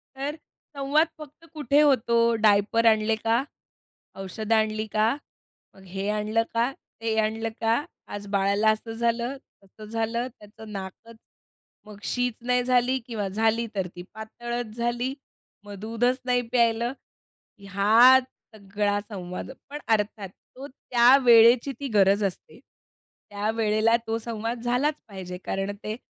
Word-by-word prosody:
तर 280 +3 -4 0.4
संवाद 285 +4 +2
फक्त 305 +2 -13
कुठे 295 -1 +2
होतो? 235 -4 +3
"डायपर 215 +1 +3
आणले 220 0 +4
का? 225 +3 0 0.7
औषधं 205 +4 -2
आणली 215 0 0
का?" 215 +3 +2 0.6
मग 190 - -17
हे 195 +2 -4
आणलं 215 +2 0
का? 235 +3 +1 0.3
ते 225 -1 -1
आणलं 220 +1 -1
का? 225 +5 +2 0.2
आज 205 0 -7
बाळाला 200 +2 +2
असं 220 +1 -5
झालं, 235 +3 -1 0.3
तसं 205 +2 -14
झालं. 230 +2 -2
त्याचं 215 +1 -13
नाकच 200 +4 -8 0.7
मग 210 -1 -12
शीच 245 +1 -1
नाही 250 +1 +1
झाली 250 +1 +2
किंवा 220 -5 -3
झाली 225 +4 +1
तर 190 -2 -1
ती 175 - -7
पातळच 235 +1 -6
झाली. 240 +2 -1 0.5
मग 205 0 -10
दूधच 230 +4 0
नाही 250 -1 +2
प्यायलं. 235 0 +2 0.7
ह्यात 215 +6 +5 0.3
सगळा 205 0 -1
संवाद 185 +1 -6 0.2
पण 295 +1 -6
अर्थात 210 -3 0
तो 265 +8 -13
त्या 250 -1 +4
वेळेची 235 +2 +6
ती 280 - -4
गरज 200 +1 +4
असते. 195 +4 -5 0.7
त्यावेळेला 215 +2 +1
तो 225 0 0
संवाद 230 +1 -4
झालाच 250 +5 +1
पाहिजे 185 -3 -7
कारण 195 +1 -2
ते 215 +1 -3
225 Hz, 135 wpm, -25 LUFS, 210-245 Hz, 0.7 s, वेळेची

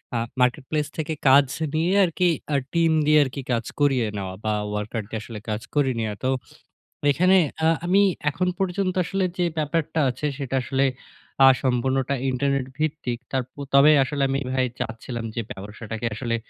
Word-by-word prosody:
আ - - +2 0.2
marketplace 145 +4 0
থেকে 160 0 -2
কাজ 140 +2 +7 0.3
নিয়ে 165 +4 +1
আরকি 180 +1 +1 0.3
আ - - +3 0.2
টিম 165 -1 +3
দিয়ে 150 0 +5
আরকি 140 +1 -5
কাজ 115 -1 0
করিয়ে 135 -5 +3
নেওয়া 95 -2 -4
বা, 110 - +1 0.2
ওয়ার্কার 105 +2 -3
দিয়ে 110 - -4
আসলে 110 -2 -8
কাজ 105 0 -2
করে 140 -3 +3
নিয়া। 110 -2 -2
তো 130 - +1 0.8
এখানে 185 +6 +4 0.3
আ - - +5 0.2
আমি 190 +3 +4 0.3
এখন 170 +5 -1
পর্যন্ত 190 0 0
আসলে 195 +2 -1
যে 180 - +2
ব্যাপারটা 155 +1 -1
আছে 130 +4 -4
সেটা 135 -2 -3
আসলে 135 +2 +1 0.6
আ - - +9 0.2
সম্পূর্ণটা 130 +1 +1
ইন্টারনেট 135 0 0
ভিত্তিক। 150 -6 -2
তারপ 130 -2 -1 0.3
তবে 140 +2 +7
আসলে 140 +1 -2
আমি 135 +1 0
ভাই 130 -1 +2
চাচ্ছিলাম 115 +1 -5
যে 115 - -1
ব্যবসাটাকে 105 +3 -7
আসলে 115 0 -2
135 Hz, 165 wpm, -24 LUFS, 120-155 Hz, 0.8 s, আ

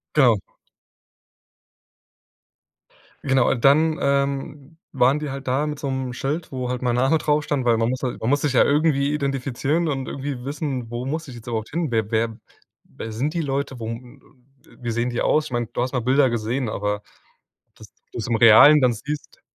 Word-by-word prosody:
Genau. 120 -9 +5 2.8
Genau 135 -2 +3
und 120 - -2
dann, 155 +4 +4
ähm, 140 +1 -1 0.2
waren 135 +4 +3
die 150 - -4
halt 135 0 -7
da 135 +4 0
mit 150 -1 -4
so 140 - -4
'nem 130 -1 -3
Schild, 145 +6 -3
wo 130 -2 -4
halt 125 0 -3
mein 120 -1 +1
Name 135 +6 +3
drauf 150 0 +1
stand, 140 -4 -1
weil 120 -1 +3
man 115 +1 +1
muss 130 - -3
ja 125 -2 -3
man 110 - -1
muss 145 +1 +2
sich 140 -2 -1
ja - - +6
irgendwie 145 -1 +2
identifizieren 140 +3 -1
und 135 -3 -3
irgendwie 135 -2 -5
wissen, 135 -4 -4
wo 120 +1 -4
muss 155 +3 -4
ich 125 - -9
jetzt 120 0 -12
überhaupt 110 -2 -3
hin? 165 -2 -2
Wer 110 -2 -1
wer 115 0 0 0.5
wer 110 - -8
sind 140 +9 -2
die 170 - 0
Leute? 135 -2 -3
Wo 115 - -6
wie 125 +1 -10
sehen 120 +2 -1
die 120 - -2
aus? 155 - +2
Ich - - -8
meine, 120 -1 -1
du 120 - -5
hast 125 +1 -2
mal 125 - 0
Bilder 130 +2 +3
gesehen, 120 +2 -2
aber 105 0 -2 0.7
dass - - -14 0.2
du - - -6
es 110 - -3
im 115 - +1
Realen 115 +7 +8
dann 125 -2 +3
siehst. 140 +5 -7
130 Hz, 195 wpm, -22 LUFS, 120-145 Hz, 2.8 s, Realen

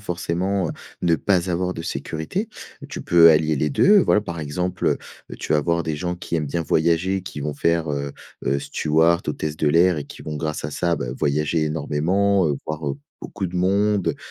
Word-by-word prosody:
forcément 90 0 -1 0.3
ne 85 -2 +3
pas 90 +3 +1
avoir 90 +1 -1
de 80 - -6
sécurité. 85 - -4 0.4
Tu - - -6
peux 85 -1 +7
allier 80 0 +3
les 75 +1 0
2. 200 - +5
Voilà, 105 - +3
par 85 -5 -6
exemple, 90 +5 -1 0.3
heu, - - -7
tu - - -2
vas 75 - +4
avoir 85 +2 0
des 80 - -2
gens 90 +4 -3
qui 85 - -6
aiment 75 -3 -1
bien 85 +4 -1
voyager, 85 +4 +1
qui 85 - -8
vont 75 +1 -3
faire, 85 +2 +1
heu 70 0 -3 0.3
heu, 70 - +1
stewart, 80 +5 +2
hôtesse 75 0 -3
de 75 - +1
l'air 85 +3 +4
et 75 - -3
qui - - -12
vont, 75 - -5
grâce 75 0 -3
à 75 - -3
ça, 85 +1 0
bah, 60 - -4
voyager 75 +3 0
énormément, 85 +5 +1
heu, 70 - 0
voir, 75 0 -4
heu, 70 - -6 0.2
beaucoup 95 - -4
de 90 - -9
monde, 100 +2 +1
85 Hz, 200 wpm, -22 LUFS, 75-90 Hz, 0.4 s, peux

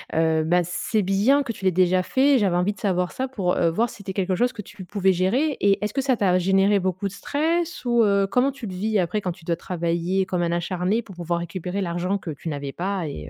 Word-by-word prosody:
Heu, 160 -1 +2
bah, 175 +3 +3
c'est 190 +4 -1
bien 215 +10 +3
que 235 - -4
tu 200 - -11
l'aies 185 - +4
déjà 185 +1 +3
fait, 265 +5 +3
j'avais 190 -4 +1
envie 180 +4 +1
de - - -18
savoir 180 -3 0
ça 260 +1 -3
pour 195 -9 -1
heu, 170 - +2
voir 220 +8 0
si - - -11
c'était 200 -2 -7
quelque 185 -1 0
chose 245 +5 +1
que 210 - -7
tu 195 0 -11
pouvais 190 0 +1
gérer 245 - +1
et 200 +1 +2
est-ce 210 - -4
que 270 - 0
ça 260 -3 +1
t'a 185 -2 +3
généré 195 +2 +3
beaucoup 185 +1 -2
de 195 - -7
stress? 330 +6 -1
Ou 235 -1 +3
heu, 200 -1 +3
comment 255 +6 +2
tu 260 -4 -9
le 190 - -6
vis 215 +4 -1
après 195 +4 -1
quand 180 - -2
tu 165 -1 -13
dois 170 - 0
travailler 170 +2 -1
comme 185 -2 -2
un 170 -1 0
acharné 180 +5 -1
pour 195 -5 -13
pouvoir 170 0 -2
récupérer 180 +3 -4
l'argent 180 +2 -1
que 170 -4 -6
tu 155 +3 -6
n'avais 140 -2 -4
pas 185 0 -3
et 75 - -7
190 Hz, 255 wpm, -23 LUFS, 175-215 Hz, -, l'aies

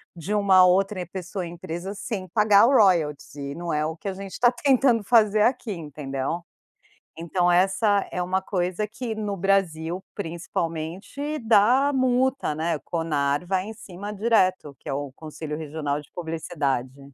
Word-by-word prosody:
de 175 +5 -4
uma 195 -3 +6
outra 185 +1 +2
pessoa, 185 +1 -5
empresa 175 +2 -6
sem 195 -1 -5
pagar 210 +2 +5
o - - +3
royalties. 170 - +2
E 140 -1 -5
não 170 +1 -4
é 150 0 0
o 160 +1 -3
que 175 - -9
a - - -3
gente 195 0 -8
tá 240 -1 +5
tentando 255 -3 +3
fazer 215 -1 +4
aqui, 245 -1 0
entendeu. 150 -1 -4 0.8
Então, 175 +2 0
essa 195 +3 +3
é 180 - -2
uma 185 +2 0
coisa 185 +1 -1
que, 230 +1 -5
no 210 -2 -3
Brasil, 180 -2 0
principalmente, 175 - -4
dá 235 +5 +4
multa, 260 - +1
né. 165 +2 0
O - - -19
Conar 150 -2 -1
vai 185 0 0
em 220 - -7
cima 200 0 -8
direto. 190 -8 +1
Que - - -9
é - - -1
o 140 0 -4
Conselho 155 -1 -6
Regional 150 -2 -3
de 145 - -20
Publicidade. 150 -6 -3
185 Hz, 160 wpm, -25 LUFS, 160-210 Hz, 0.8 s, uma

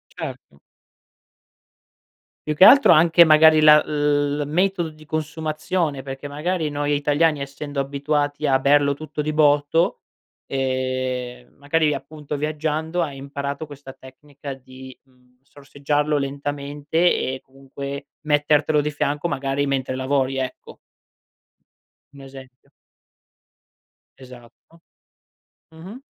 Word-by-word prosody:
Certo. 70 - -9 1.9
Più 150 - -1
che 165 - +5
altro 275 +7 +8
anche 170 +2 +6
magari 155 0 +6
la 150 0 +7
l 145 -1 0
metodo 180 +2 0
di 155 0 -16
consumazione, 155 0 -3
perché 135 +1 -8
magari 160 +2 -2
noi 145 0 -1
italiani, 145 +1 +1
essendo 140 +1 -5
abituati 145 +1 -2
a 135 -1 +4
berlo 140 +1 +3
tutto 155 +1 -6
di 155 +1 -3
botto, 150 +2 +2 0.5
ehm, 130 -2 -3
magari 150 +2 +1
appunto 150 +1 -7
viaggiando 155 +3 -2
hai 145 -5 -4
imparato 140 +2 -5
questa 145 -2 -11
tecnica 140 +2 -11
di, 130 0 -13
mhmm, 125 -1 -31
sorseggiarlo 145 +2 -2
lentamente 145 +2 -4 0.2
e 130 0 -3
comunque 140 +1 -9
mettertelo 150 0 +2
di 150 +1 -1
fianco, 145 +2 -2
magari 140 -1 -2
mentre 130 -2 -2
lavori, 135 0 -1
ecco. 130 -1 -6 1.4
Un 140 - -13
esempio. 135 -1 -14 1.5
Esatto. 125 +5 -16 0.9
Mh-mh. 185 +10 -11
145 Hz, 110 wpm, -22 LUFS, 135-155 Hz, 1.9 s, altro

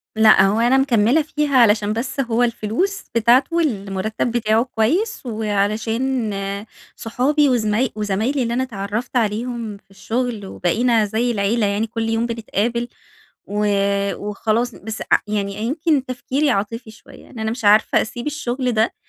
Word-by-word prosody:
لأ، 220 0 +6
هو 205 +3 +1
أنا 240 +3 +4
مكملة 265 +2 +3
فيه 300 0 -2
علشان 215 -3 +4
بس 240 +4 -4
هو 240 -2 +1
الفلوس 240 - -1
بتاعته 245 +7 +3
والمرتب 215 - -1
بتاعه 225 -1 +2
كويس، 275 - -1
وعلشان 220 +2 -1 0.6
صُحابي 275 +5 +1
وزما 230 0 +1
وزمايلي 215 +6 -1
اللي 235 0 -2
أنا 255 - 0
أتعرّفت 215 +1 -5
عليهم 225 0 -2
في 195 - -29
الشُغل 225 +1 -3
وبَقِينَا 225 +5 +1
زي 225 +4 0
العيلة 210 +1 +1
يعني 205 +3 0
كل 225 0 -3
يوم 225 +1 0
بنتقابل، 235 +1 -2 0.6
و 210 +1 -1 0.5
وخلاص 220 +3 -2
بس 220 +1 -7
ع - - +7
يعني 200 -1 -2
يمكن 280 +5 0
تفكيري 265 +3 -1
عاطفي 220 +3 -3
شوية، 220 - -16
إن 235 - -10
أنا 220 0 -1
مش 230 -2 -5
عارفة 210 +1 +5
أسيب 240 +3 -5
الشُغل 260 -4 -2
ده 225 0 +1
230 Hz, 145 wpm, -20 LUFS, 215-250 Hz, 0.6 s, ع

